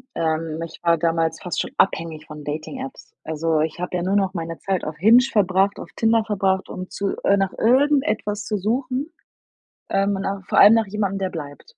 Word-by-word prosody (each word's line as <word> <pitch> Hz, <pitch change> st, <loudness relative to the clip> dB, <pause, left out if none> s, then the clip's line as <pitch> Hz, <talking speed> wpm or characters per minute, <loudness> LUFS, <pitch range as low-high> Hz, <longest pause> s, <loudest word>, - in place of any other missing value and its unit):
Ähm, 160 Hz, -1 st, -1 dB
ich 165 Hz, -, -12 dB
war 170 Hz, -1 st, +4 dB
damals 165 Hz, 0 st, 0 dB
fast 180 Hz, -, -2 dB
schon -, -, -4 dB
abhängig 165 Hz, -4 st, 0 dB
von 150 Hz, -1 st, -10 dB
Dating-Apps. 160 Hz, -, -7 dB
Also, 160 Hz, 0 st, 0 dB
ich 160 Hz, +1 st, -2 dB
habe 180 Hz, 0 st, -3 dB
ja 175 Hz, -, -1 dB
nur 190 Hz, +3 st, 0 dB
noch 195 Hz, -2 st, +1 dB
meine 165 Hz, -2 st, -5 dB
Zeit 195 Hz, -2 st, -2 dB
auf 155 Hz, 0 st, -5 dB
Hinge 220 Hz, +9 st, +6 dB
verbracht, 195 Hz, -1 st, +2 dB
auf -, -, -8 dB
Tinder 225 Hz, 0 st, +3 dB
verbracht, 190 Hz, -3 st, 0 dB
um 185 Hz, 0 st, -7 dB
zu 200 Hz, -1 st, -2 dB
äh, 200 Hz, -, +4 dB
nach 195 Hz, -1 st, 0 dB
irgendetwas 230 Hz, -5 st, +2 dB
zu 210 Hz, -, -1 dB
suchen, 255 Hz, -, -2 dB, 0.8 s
ähm, 195 Hz, +1 st, +1 dB
nach 195 Hz, 0 st, -3 dB
vor -, -, -1 dB
allem 210 Hz, +2 st, +9 dB
nach 225 Hz, -2 st, +2 dB
jemandem, 200 Hz, -1 st, -2 dB
der 190 Hz, -1 st, -1 dB
bleibt. 160 Hz, -, -9 dB
195 Hz, 195 wpm, -22 LUFS, 165-210 Hz, 0.8 s, allem